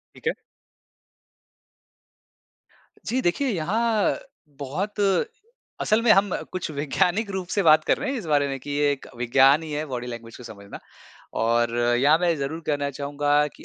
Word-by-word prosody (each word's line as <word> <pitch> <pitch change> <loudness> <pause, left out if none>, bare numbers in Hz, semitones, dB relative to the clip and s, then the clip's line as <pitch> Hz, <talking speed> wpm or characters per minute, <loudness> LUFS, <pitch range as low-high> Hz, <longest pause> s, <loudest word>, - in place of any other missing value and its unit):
ठीक - - -8
है। - - +2 2.7
जी 255 +2 0
देखिए 220 +11 0
यहाँ 215 +4 0 0.4
बहुत 195 +10 -4 0.8
असल 215 +2 +2
में 230 -2 +5
हम 195 -2 +4 0.2
कुछ 185 -3 -4
वैज्ञानिक 175 +8 0
रूप 190 -2 -4
से 200 0 0
बात 155 -1 +6
कर - - +2
रहे 290 - -3
हैं, 275 - -2
इस 205 - -6
बारे 145 -2 +2
में 135 -1 -4
कि 145 - -10
ये 145 0 +2
एक 140 - -5
विज्ञान 135 +5 +4
ही 155 - -7
है 150 +1 -2
बॉडी 125 -3 -5
लैंग्वेज 115 -1 -8
को 125 - -12
समझना। 100 -3 -10 0.6
और 115 +1 +1
यहाँ 125 +6 +3
मैं 175 -2 +2
ज़रूर 145 +4 -4
कहना 145 -1 -1
चाहूँगा 145 +1 0
कि - - -15
150 Hz, 165 wpm, -24 LUFS, 135-190 Hz, 2.7 s, बात